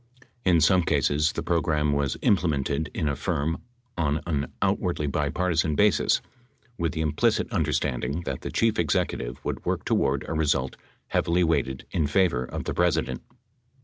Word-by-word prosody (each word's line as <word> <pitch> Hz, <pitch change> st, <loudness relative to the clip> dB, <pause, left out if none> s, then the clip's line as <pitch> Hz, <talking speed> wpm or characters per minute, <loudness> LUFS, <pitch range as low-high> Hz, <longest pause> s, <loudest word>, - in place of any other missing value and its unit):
In 85 Hz, -3 st, +4 dB
some 90 Hz, +4 st, +5 dB
cases 75 Hz, -1 st, +1 dB
the 80 Hz, -, -3 dB
program 75 Hz, -3 st, +1 dB
was 70 Hz, -1 st, 0 dB
implemented 80 Hz, -5 st, +1 dB
in 80 Hz, -, -2 dB
a 70 Hz, -, 0 dB
firm 75 Hz, +5 st, -2 dB, 0.3 s
on 75 Hz, -2 st, 0 dB
an 75 Hz, -5 st, -2 dB
out -, -, +2 dB
wardly 75 Hz, -, -2 dB
bipartisan 75 Hz, +2 st, 0 dB
basis, 105 Hz, +3 st, +3 dB, 0.5 s
with 85 Hz, -8 st, -1 dB
the 80 Hz, -, -2 dB
implicit 75 Hz, -1 st, +1 dB
understanding 70 Hz, +6 st, -1 dB
that 70 Hz, -6 st, -4 dB
the -, -, -5 dB
chief 115 Hz, -3 st, +1 dB
executive 65 Hz, -6 st, -1 dB
would -, -, -3 dB
work -, -, -2 dB
toward 70 Hz, 0 st, +1 dB
a -, -, -3 dB
result 70 Hz, -4 st, 0 dB, 0.3 s
heavily 85 Hz, +2 st, +2 dB
weighted 65 Hz, -6 st, 0 dB
in 80 Hz, -4 st, +1 dB
favor 85 Hz, -6 st, +2 dB
of -, -, -5 dB
the -, -, -3 dB
President. 80 Hz, -7 st, 0 dB
75 Hz, 155 wpm, -26 LUFS, 70-85 Hz, 0.5 s, some